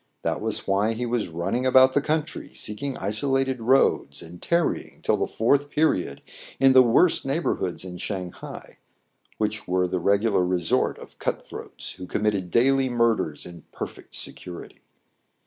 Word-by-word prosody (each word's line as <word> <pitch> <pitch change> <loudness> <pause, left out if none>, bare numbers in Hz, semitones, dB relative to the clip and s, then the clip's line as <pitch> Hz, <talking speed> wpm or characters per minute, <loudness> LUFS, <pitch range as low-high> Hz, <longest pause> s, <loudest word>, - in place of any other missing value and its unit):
That - - -1
was - - -1
why 100 +3 +2
he 120 +2 -3
was 120 -3 -1
running 85 +9 -2
about 130 0 +6
the 145 - +3
country, 155 +1 -2
seek 105 +3 -3
ing 140 -2 -3
isolated 130 +6 0
roads, 115 - +2
and 85 +2 -12
tarrying 170 -1 -1
till - - +3
the - - -1
foufth 140 +6 +1
period 95 - 0 0.4
in 135 0 +6
the 130 - +9
worst 125 +8 +4
neighborhoods 135 - -2
in 90 -1 -8
Shang 95 -2 -4
hai, - - -11 0.6
which 105 0 -2
were 90 0 +1
the 90 +1 -2
regular 100 +1 +2
resort 90 -2 +1
of - - -14
cut - - -1
throats - - -7
who 90 - -9
committed 100 -2 -1
daily 135 +5 +3
murders 115 -10 0
in 85 -1 -10
perfect - - -8
security. 90 -1 -8
110 Hz, 160 wpm, -25 LUFS, 90-135 Hz, 0.6 s, the